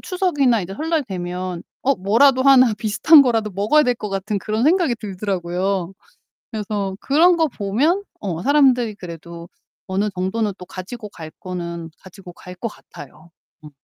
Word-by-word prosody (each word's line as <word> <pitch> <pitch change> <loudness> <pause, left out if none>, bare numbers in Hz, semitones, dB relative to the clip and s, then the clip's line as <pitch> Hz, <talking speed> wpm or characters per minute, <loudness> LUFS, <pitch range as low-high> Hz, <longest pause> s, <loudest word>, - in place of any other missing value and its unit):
추석이나 290 - +1
이제 180 - -7
설날 320 +5 -1
되면 180 -3 -5 0.2
어 275 +2 +2
뭐라도 255 +8 +3
하나 255 -4 +6
비슷한 220 +9 +5
거라도 225 -5 0
먹어야 205 +11 +3
될 250 -3 +1
것 210 - -6
같은 195 +2 -2
그런 215 +3 -2
생각이 335 -5 +3
들더라고요. 190 -3 -3 0.6
그래서 205 -3 -3
그런 340 +5 +4
거 320 - +2
보면 280 - 0 0.2
어 175 -4 -4
사람들이 260 -5 +3
그래도 170 -2 -10 0.4
어느 195 +3 -1
정도는 195 +3 -2
또 180 - -10
가지고 210 +5 -8
갈 160 -4 -10
거는 170 -2 -6
가지고 185 -1 -13
갈 180 +1 -11
것 185 - -4
같아요. 160 - -13 0.3
음. 150 - -10
210 Hz, 330 characters per minute, -20 LUFS, 185-260 Hz, 0.6 s, 하나